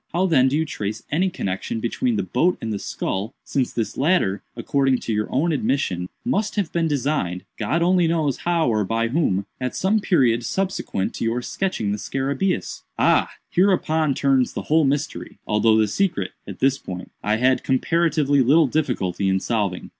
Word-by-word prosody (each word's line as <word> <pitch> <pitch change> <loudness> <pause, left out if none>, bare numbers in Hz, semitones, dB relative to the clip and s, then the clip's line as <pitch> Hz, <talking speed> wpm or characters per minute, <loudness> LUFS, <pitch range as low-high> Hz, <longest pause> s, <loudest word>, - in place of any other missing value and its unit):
How 180 +2 +2
then 135 -8 +4
do 135 +3 +1
you 160 - +1
trace 105 -6 -4
any 180 +6 +2
connexion 95 - -3
between 230 - -1
the 200 - 0
boat 180 +2 +1
and 110 -1 -3
the 100 - -3
skull—since 110 +9 -3
this 115 -2 -3
latter, 140 - +2 0.2
according 135 +2 +1
to 115 - -2
your 105 0 0
own 160 +6 +1
admission, 95 - -1 0.2
must 215 -4 0
have 200 -6 -1
been 170 -1 +1
designed 140 - -1
(God 150 +11 0
only 180 -1 +3
knows 155 -5 0
how 170 -3 +1
or 110 -3 +2
by 115 +3 0
whom) 115 - +1
at 125 -1 -3
some 205 +4 +2
period 125 - +2
subsequent 185 - -2
to - - -4
your 115 +2 -1
sketching 185 - -2
the 105 - -2
scarabæus?" 140 - -2 0.2
"Ah, - - +3 0.2
hereupon 160 -6 +2
turns 135 -2 +2
the - - -4
whole 155 0 +3
mystery; 145 +3 -2
although 110 +1 +3
the 110 -1 +3
secret, 185 - -1 0.2
at - - -9
this 135 +1 +3
point, 90 -1 -8
I 105 +1 +1
had 130 +3 +2
comparatively 145 0 +2
little 150 +6 +5
difficulty 110 - -1
in 95 0 +2
solving. 100 -4 -2
135 Hz, 175 wpm, -22 LUFS, 110-165 Hz, 0.2 s, little